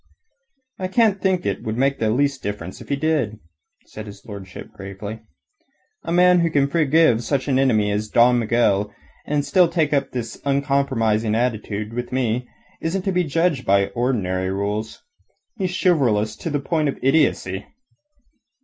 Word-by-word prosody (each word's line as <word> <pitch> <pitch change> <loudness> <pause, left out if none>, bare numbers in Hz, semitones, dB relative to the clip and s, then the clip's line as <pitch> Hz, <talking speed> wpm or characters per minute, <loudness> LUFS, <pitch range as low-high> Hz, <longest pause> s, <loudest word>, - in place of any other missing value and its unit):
"I 185 - -2
can't 205 0 +2
think 185 -2 +1
that - - -1
it - - -15
would 110 +1 -3
make 135 +2 +1
the 110 - +1
least 140 +3 +1
difference 100 -3 -6
if - - -12
he 140 - +1
did," 140 -7 0 0.5
said 110 0 -9
his 100 -1 -12
lordship 100 -5 -9
gravely. 100 +3 -8 0.8
"A - - -5
man 180 +1 +5
who 170 -1 +2
can 140 -3 +2
forgive 150 -5 +3
such 135 +2 -1
an 135 -2 +2
enemy 110 -6 +2
as 105 +1 -2
Don 120 +2 +4
Miguel 105 -3 +1 0.4
and 145 -1 0 0.3
take 160 -4 +1
up 140 - +1
this 115 -3 -6
uncompromising 135 -6 +1
attitude 110 -2 -2
with 120 +1 -4
me 125 -1 -1 0.3
isn't 180 +3 -2
to 195 - 0
be 180 -1 +1
judged 165 -3 0
by 100 0 +2
ordinary 100 -5 -1
rules. 100 +3 -3 0.5
He's 185 -3 -2
chivalrous 120 - +2
to 165 - -4
the 145 -1 -1
point 155 +1 0
of - - -4
idiocy." 130 -9 +1
125 Hz, 160 wpm, -22 LUFS, 105-150 Hz, 0.8 s, man